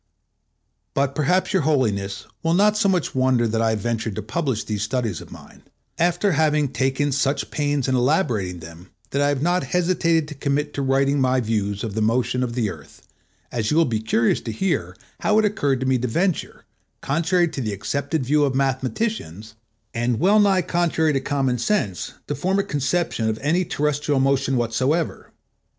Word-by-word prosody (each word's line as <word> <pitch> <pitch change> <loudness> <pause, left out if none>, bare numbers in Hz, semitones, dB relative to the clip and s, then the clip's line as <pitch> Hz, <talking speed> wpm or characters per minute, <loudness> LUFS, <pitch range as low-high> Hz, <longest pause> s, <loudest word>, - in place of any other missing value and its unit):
But 135 0 +1
perhaps 180 +8 +1
Your 190 - +3
Holiness 105 -10 0 0.2
will 165 +1 +1
not 210 +3 +4
so 210 -2 +2
much 180 -4 0
wonder 130 -2 +2
that 110 0 0
I 115 - +2
have 110 -2 -1
ventured 115 -2 -2
to 110 - -4
publish 125 -2 -2
these 105 -1 -3
studies 110 -4 -2
of - - -13
mine, - - -13 0.4
after 175 +4 +2
having 150 -2 +2
taken 135 +2 0
such 140 +1 0
pains 145 -3 0
in 130 - +1
elaborating 120 - 0
them 85 +2 -12 0.2
that 140 - 0
I 145 - +3
have 145 -1 -1
not 175 +2 +2
hesitated 170 -3 +2
to 155 - -7
commit 145 +1 -1
to 140 - -3
writing 135 +1 +2
my 130 0 +2
views 105 -3 -1
of 110 -3 -4
the 110 - -1
motion 120 +3 +1
of 125 -2 -2
the 120 -3 0
Earth, 75 -5 -14 0.4
as 115 -3 -1
you 155 - +1
will 165 - +5
be 115 -5 -1
curious 110 +1 +1
to 115 - -5
hear 110 - -2 0.2
how 210 - +2
it 220 - +4
occurred 145 - 0
to - - -1
me 130 -1 +2
to 125 - -1
venture, 175 +8 -1 0.4
contrary 170 +5 +1
to 135 - -5
the 110 -3 -2
accepted 140 - -2
view 150 +3 +3
of 135 -2 0
mathematicians, 130 - -2 0.4
and 120 0 0
well 200 +5 +4
nigh 195 -3 +3
contrary 165 -3 +1
to 135 - 0
common 135 -3 0
sense, 120 - -1
to - - -3
form 185 +7 0
a 200 - +2
conception 145 - -1
of 110 - -2
any 170 +6 +2
terrestrial 150 -3 0
motion 135 0 +1
whatsoever. 130 +8 -1
135 Hz, 190 wpm, -22 LUFS, 115-160 Hz, 0.4 s, will